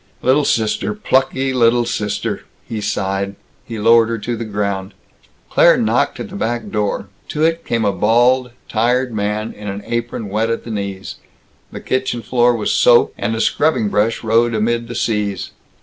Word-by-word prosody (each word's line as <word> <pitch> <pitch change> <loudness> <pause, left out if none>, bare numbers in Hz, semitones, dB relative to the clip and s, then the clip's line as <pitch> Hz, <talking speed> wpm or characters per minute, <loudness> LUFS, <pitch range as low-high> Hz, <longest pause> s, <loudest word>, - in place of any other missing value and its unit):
"Little 135 +3 +3
sister 110 - 0
plucky 135 -7 +1
little 120 -1 +3
sister!" 105 -3 -2 0.2
he 110 -2 -4
sighed. 100 0 -2 0.3
He 115 - -6
lowered 115 +1 +5
her 115 - -1
to 120 +2 -3
the 115 0 -5
ground. 100 -2 -3 0.6
Claire - - +6
knocked - - +1
at - - -6
the - - -9
back 120 +1 -3
door. 105 -1 -1 0.2
To 150 - -2
it 165 +1 +1
came 115 -2 -1
a 100 - +3
bald, 120 +6 +3 0.2
tired 125 +2 +1
man, 105 +1 -2
in 105 0 -9
an 100 +1 -5
apron 115 -2 -3
wet 110 +3 0
at 115 - -2
the 115 - -7
knees. 100 -2 -5 0.5
The - - -8
kitchen 130 -2 -2
floor 120 +1 +3
was 110 - -1
soaped, 120 -1 +5
and 115 - -2
a - - -3
scrubbing 130 -3 +1
brush 105 +4 0
rode 115 +1 +2
amid 115 +2 0
the 120 - -7
seas. 105 -4 -1
115 Hz, 175 wpm, -18 LUFS, 105-120 Hz, 0.6 s, Claire